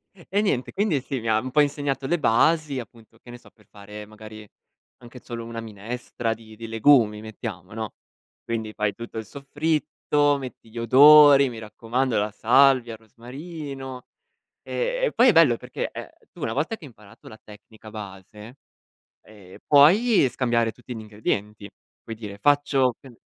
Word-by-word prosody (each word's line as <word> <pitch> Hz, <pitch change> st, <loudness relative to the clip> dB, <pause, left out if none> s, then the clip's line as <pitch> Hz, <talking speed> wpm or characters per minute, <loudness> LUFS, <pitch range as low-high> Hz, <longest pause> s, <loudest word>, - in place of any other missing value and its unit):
E 195 Hz, +3 st, -2 dB
niente, 135 Hz, -12 st, -1 dB
quindi, 190 Hz, -9 st, 0 dB
sì, 135 Hz, -1 st, -5 dB
mi 115 Hz, -, -7 dB
ha 110 Hz, 0 st, +2 dB
un 130 Hz, -, -6 dB
po' 150 Hz, -, +1 dB
insegnato 140 Hz, -2 st, -2 dB
le 175 Hz, +4 st, 0 dB
basi, 150 Hz, +3 st, +2 dB
appunto, 115 Hz, 0 st, -13 dB
che 120 Hz, -, -15 dB
ne 120 Hz, -, -11 dB
so, -, -, -19 dB
per 105 Hz, -3 st, -27 dB
fare, 105 Hz, +1 st, -11 dB
magari, 110 Hz, 0 st, -12 dB, 0.5 s
anche 125 Hz, +1 st, -13 dB
solo 115 Hz, -1 st, -8 dB
una 115 Hz, 0 st, -7 dB
minestra 115 Hz, +1 st, -5 dB
di 110 Hz, -1 st, -15 dB
di 115 Hz, +1 st, -9 dB
legumi, 115 Hz, -2 st, +3 dB
mettiamo, 105 Hz, -3 st, -8 dB
no, 110 Hz, -1 st, -6 dB, 0.5 s
quindi, 110 Hz, -2 st, -4 dB
fai 105 Hz, -2 st, -1 dB
tutto 115 Hz, 0 st, -9 dB
il 110 Hz, -, -5 dB
soffritto, 145 Hz, +1 st, -1 dB
metti 125 Hz, -4 st, -10 dB
gli 115 Hz, -, -13 dB
odori, 140 Hz, +3 st, +7 dB
mi 115 Hz, -, -9 dB
raccomando, 115 Hz, +2 st, -2 dB
la 105 Hz, +1 st, -1 dB
salvia, 125 Hz, +1 st, +3 dB
il 110 Hz, -, -11 dB
rosmarino. 135 Hz, -, -9 dB, 0.6 s
E -, -, -3 dB
e, -, -, -1 dB
poi, -, -, +6 dB
è -, -, +7 dB
bello -, -, +5 dB
perché -, -, -6 dB
è -, -, -8 dB, 0.2 s
tu, -, -, -14 dB
una -, -, -2 dB
volta 225 Hz, -, -2 dB
che 180 Hz, -, -19 dB
hai 145 Hz, -, -10 dB
imparato 105 Hz, -4 st, -17 dB
la 110 Hz, -, -14 dB
tecnica 110 Hz, +1 st, -15 dB
base, 105 Hz, +2 st, -11 dB, 0.7 s
ehm, 100 Hz, -4 st, -16 dB
puoi 165 Hz, -, +5 dB
scambiare 120 Hz, -3 st, 0 dB
tutti 125 Hz, +1 st, -10 dB
gli -, -, -7 dB
ingredienti, 105 Hz, -1 st, -4 dB, 0.4 s
puoi 115 Hz, -, -7 dB
dire: 105 Hz, -2 st, -9 dB
“Faccio 140 Hz, -1 st, +2 dB
che 135 Hz, -, -15 dB
n” 120 Hz, -, -17 dB
120 Hz, 175 wpm, -24 LUFS, 110-140 Hz, 0.7 s, odori